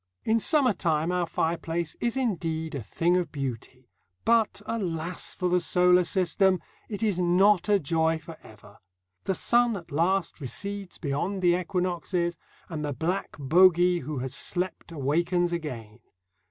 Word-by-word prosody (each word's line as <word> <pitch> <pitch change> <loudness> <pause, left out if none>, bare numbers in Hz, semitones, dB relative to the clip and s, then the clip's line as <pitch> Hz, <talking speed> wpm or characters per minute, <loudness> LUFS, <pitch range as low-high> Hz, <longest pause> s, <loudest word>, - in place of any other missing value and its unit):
In 225 +1 +2
summer 270 -2 +3
time 165 -2 0
our 180 -1 0
fireplace 165 0 -2
is 235 +2 -1
indeed 165 -9 -2
a 140 - -3
thing 170 - 0
of 175 -4 -2
beauty, 130 -2 -6 0.4
but, 230 -3 +3
alas 175 -5 -3
for 180 - -1
the 180 0 +2
solar 180 +2 +4
system! 185 +1 +2 0.3
it 210 0 -4
is 205 -5 +1
not 180 +2 +3
a 205 - +5
joy 160 0 +1
for 160 +1 -11
ever. 105 -1 -16 0.5
The 190 - 0
sun 240 0 +3
at 170 -3 -12
last 170 +3 0
recedes 200 +8 -6
beyond 175 +7 -2
the 175 -1 +5
equinoxes, 180 -1 -2 0.3
and 155 -3 -5
the 145 -1 -2
black 175 +9 -3
bogey 175 +4 +4
who 150 +1 -5
has 130 +1 -4
slept 180 +2 -3
awakens 170 +4 0
again. 120 -10 -6
175 Hz, 150 wpm, -27 LUFS, 160-190 Hz, 0.5 s, a